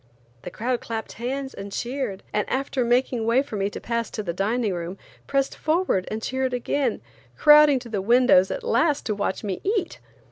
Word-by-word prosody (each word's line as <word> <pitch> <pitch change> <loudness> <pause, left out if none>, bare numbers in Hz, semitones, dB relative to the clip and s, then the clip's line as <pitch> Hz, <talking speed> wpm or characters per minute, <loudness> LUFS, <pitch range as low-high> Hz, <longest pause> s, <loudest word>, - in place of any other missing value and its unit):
The - - -7
crowd 245 +2 -2
clapped 225 -1 -5
hands 265 +3 -4
and 200 0 -8
cheered, 240 -4 -3
and 210 - 0
after 265 -1 -1
making 240 -1 +1
way 245 +4 +3
for 250 - -8
me 200 0 0
to - - -7
pass 235 -1 -2
to 215 - -5
the 170 -3 -3
dining 210 +3 0
room, 175 +2 -5 0.3
pressed 275 -1 0
forward 315 - 0
and 220 +1 -4
cheered 260 -1 -1
again, 265 +3 -1 0.4
crowding 300 -2 +7
to 245 -2 -8
the 205 -3 -2
windows 235 -3 +5
at - - -4
last 330 -11 +1
to 215 - 0
watch 205 0 -2
me 195 -3 -3
eat. 395 -3 -1
240 Hz, 190 wpm, -24 LUFS, 210-275 Hz, 0.4 s, crowding